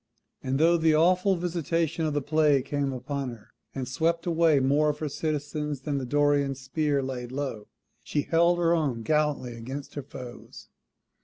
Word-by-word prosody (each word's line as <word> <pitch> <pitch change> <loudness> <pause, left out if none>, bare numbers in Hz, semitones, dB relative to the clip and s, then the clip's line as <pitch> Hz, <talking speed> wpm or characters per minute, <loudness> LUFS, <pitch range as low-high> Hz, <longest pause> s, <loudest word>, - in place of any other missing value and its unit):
And 130 0 -1
though 170 +2 +5
the 160 -1 +3
awful 180 +4 +3
visitation 165 -2 -1
of 150 - -2
the 145 - 0
Plague 150 -2 +3
came 140 -1 -1
upon 135 +1 -4
her, 115 -3 -12 0.2
and 130 -2 -3
swept 165 +6 0
away 165 -3 +3
more 145 +3 +3
of 150 - -2
her 155 - -3
citizens 150 -1 -3
than 140 0 -2
the 130 - -5
Dorian 145 0 +2
spear 140 +1 -1
laid 125 -2 -5
low, 130 -6 -4 0.4
she 145 - -1
held 170 +1 +3
her 170 -1 +3
own 140 -9 0
gallantly 150 -4 0
against 130 +5 -7
her 145 - -4
foes. 125 -2 -11
145 Hz, 170 wpm, -27 LUFS, 135-160 Hz, 0.4 s, though